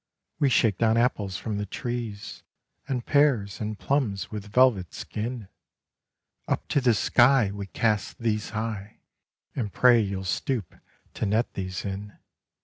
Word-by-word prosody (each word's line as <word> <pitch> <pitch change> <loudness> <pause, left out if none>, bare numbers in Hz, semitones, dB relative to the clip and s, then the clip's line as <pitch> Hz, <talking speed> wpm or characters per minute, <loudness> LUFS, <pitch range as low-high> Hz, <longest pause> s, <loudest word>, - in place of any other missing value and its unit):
We 140 - +3
shake 110 -6 +3
down 115 0 +3
apples 105 -6 +1
from 105 -1 -3
the 105 - -3
trees 120 -2 -5 0.5
And 125 -3 -2
pears, 130 -10 +2
and 105 0 -3
plums 110 -10 -1
with 105 -1 -6
velvet 110 - +3
skin 115 -1 -5 1.0
Up - - -1
to 145 - +2
the 120 -3 +4
sky 120 -1 +4
We 100 -1 -6
cast 105 0 0
these 105 -2 -1
high 110 -2 -5 0.5
And 110 -6 -2
pray 125 +2 +5
you'll 95 -2 -3
stoop 115 - -2 0.4
to 110 - -2
net 110 +4 0
these 95 0 -4
in. 100 +1 -6
110 Hz, 140 wpm, -26 LUFS, 100-120 Hz, 1.0 s, pray